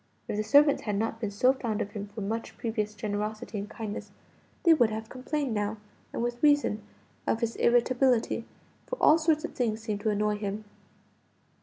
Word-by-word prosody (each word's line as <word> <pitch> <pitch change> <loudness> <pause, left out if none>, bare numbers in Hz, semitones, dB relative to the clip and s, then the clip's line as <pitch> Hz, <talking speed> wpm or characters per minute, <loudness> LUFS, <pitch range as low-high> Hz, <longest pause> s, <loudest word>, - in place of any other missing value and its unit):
If - - -2
the 210 - 0
servants 285 +6 +5
had 210 -2 -2
not 225 +2 -1
been 215 -3 -2
so 250 +6 +3
fond 230 -5 -3
of 200 - -3
him 205 -1 -5
for 210 +2 -8
much 225 +3 -4
previous 215 -2 -2
generosity 210 +1 -3
and 205 +1 -6
kindness, 215 -2 -6 0.5
they 335 - +7
would 245 -8 +4
have 220 +1 -5
complained 265 0 -2
now, 210 +1 -1 0.3
and - - -2
with 240 0 -2
reason, 290 -8 +3 0.5
of 225 - +1
his 230 -1 -1
irritability, 245 -1 +3 0.4
for - - -2
all 310 +2 +6
sorts 315 -1 +2
of - - -7
things 225 -3 0
seemed 210 -2 -3
to 215 - +1
annoy 210 0 +1
him. 205 +1 -4
220 Hz, 185 wpm, -29 LUFS, 210-255 Hz, 0.5 s, they